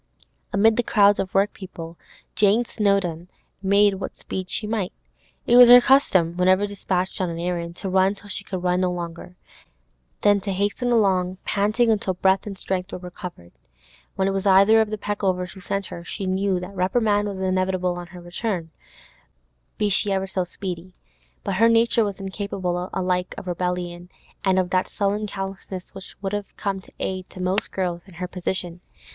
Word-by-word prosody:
Amid 215 +3 +4
the - - +4
crowds 205 -3 +4
of 190 - -2
workpeople, 190 -4 -2 0.4
Jane 215 +3 +3
Snowdon 195 -7 0 0.3
made 200 +1 +4
what - - -5
speed 185 -1 -5
she 215 - -2
might. 210 -4 -2 0.5
It 240 - +5
was 245 -1 +10
her 245 0 +11
custom, 190 -11 +3
whenever 185 +2 +4
dispatched 190 -2 -2
on 185 - 0
an 165 - -5
errand, 170 -1 -3
to 195 - -6
run 190 +1 +3
till 205 - -15
she 200 - -5
could 185 -2 -5
run 180 0 +2
no 180 -1 +1
longer, 175 0 -6 0.9
then 205 -1 +4
to 195 0 -2
hasten 205 +6 0
along 190 -5 +2
panting 215 +4 +2
until 200 -3 0
breath 190 +2 +2
and 195 -2 -6
strength 185 0 -3
were - - -4
recovered. 180 - -9 0.6
When 190 - +1
it - - +1
was 195 +1 -1
either 200 +4 +6
of 220 - 0
the 215 - -3
Peckovers 190 -3 -2
who 195 - -12
sent 195 +2 -2
her, 170 - -8
she 190 +3 -5
knew 190 0 0
that 180 +2 -8
reprimand 205 +2 +1
was 200 -2 -4
inevitable 185 -1 0
on 175 0 -7
her 175 0 -11
return, 175 -1 -4 1.1
be 210 - +1
she 200 +1 +2
ever 190 0 0
so 190 -1 -1
speedy; 180 0 -6 0.5
but 185 - -2
her 230 +2 +5
nature 230 0 +4
was 200 -3 -3
incapable 190 -2 -3
alike 180 -1 -1
of - - -7
rebellion 180 0 -3 0.3
and 190 -1 +2
of 180 -1 +1
that 185 0 +2
sullen 205 +1 -1
callousness 195 -2 -6
which 195 -1 -11
would 195 +1 -2
have 205 -1 -5
come 195 -1 -2
to - - -22
the - - -2
aid 185 -1 -3
of 185 - -5
most 185 +3 0
girls 180 -2 -2
in 185 - -15
her 180 +2 -4
position. 180 -1 -2
190 Hz, 185 wpm, -23 LUFS, 180-205 Hz, 1.1 s, her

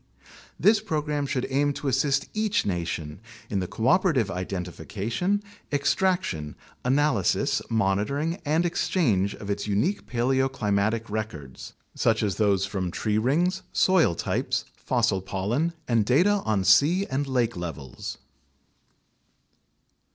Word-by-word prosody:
This 215 +1 +5
program 150 -2 -2
should 125 -2 -1
aim 145 +2 +2
to 140 - -5
assist 140 +1 +1
each 215 -1 0
nation 85 -4 -3 0.3
in 100 - +1
the 90 - -2
cooperative 130 - +2
identification, 100 - -3 0.3
extraction, 145 - 0 0.3
analysis, 135 - +2
monitoring, 115 - 0
and 155 +3 +1
exchange 115 - +1
of 100 -1 -5
its 100 +1 -3
unique 110 - 0
paleoclimatic 115 -4 0
records, 105 -12 -6 0.2
such 110 -1 +1
as 100 -3 -1
those 100 -3 +2
from 95 -2 -3
tree 105 +4 0
rings, 170 +10 +1
soil 180 - +4
types, - - -1
fossil 95 - 0
pollen, 105 - -1 0.2
and 115 -3 +3
data 180 - +3
on 105 -3 +1
sea 145 - +5
and 140 -1 -2
lake 125 -3 0
levels. 80 -7 -6
115 Hz, 115 wpm, -26 LUFS, 100-150 Hz, 0.3 s, This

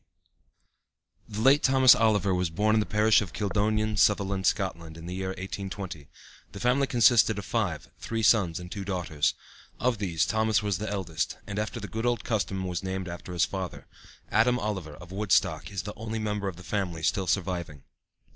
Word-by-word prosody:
P. 105 - -10
The 110 - -2
late 135 +5 +6
Thomas 130 -1 +7
Oliver 105 -4 +2
was 90 -1 0
born 105 +7 +1
in - - +4
the 105 - -1
parish 110 +1 +4
of 100 -6 -6
Kildonan, 105 +1 0
Sutherland, 100 0 +2
Scotland, 85 -5 -2
in 80 - -10
the 90 - -5
year 95 0 -3
1820. 95 -4 -6 0.5
The 100 - -7
family 125 +4 +2
consisted 120 -3 +4
of 100 - -5
five, 100 -10 -2
three 115 -1 -3
sons 95 -7 +3
and 90 0 -9
two 100 - -4
daughters. 90 -6 -1 0.4
Of 125 -3 +1
these 85 -6 0
Thomas 110 -1 +1
was 100 -4 -1
the 110 - -3
eldest, 95 -6 -2
and 105 0 -4
after 110 +2 -3
the 100 - -6
good 115 +3 -2
old 120 -3 0
custom 100 -4 -1
was 90 -2 -3
named 95 0 -4
after 85 +1 -7
his 90 -1 +2
father. 95 -3 -6 0.5
Adam 120 +3 +3
Oliver, 95 -10 -4
of 90 +3 -13
Woodstock, 100 0 +1
is 95 -3 -3
the 105 - -6
only 110 0 -5
member 105 -2 -2
of 95 - -4
the 90 - -12
family 85 -2 -3
still 95 +3 0
surviving. 85 -6 -2
100 Hz, 190 wpm, -27 LUFS, 90-110 Hz, 0.5 s, Thomas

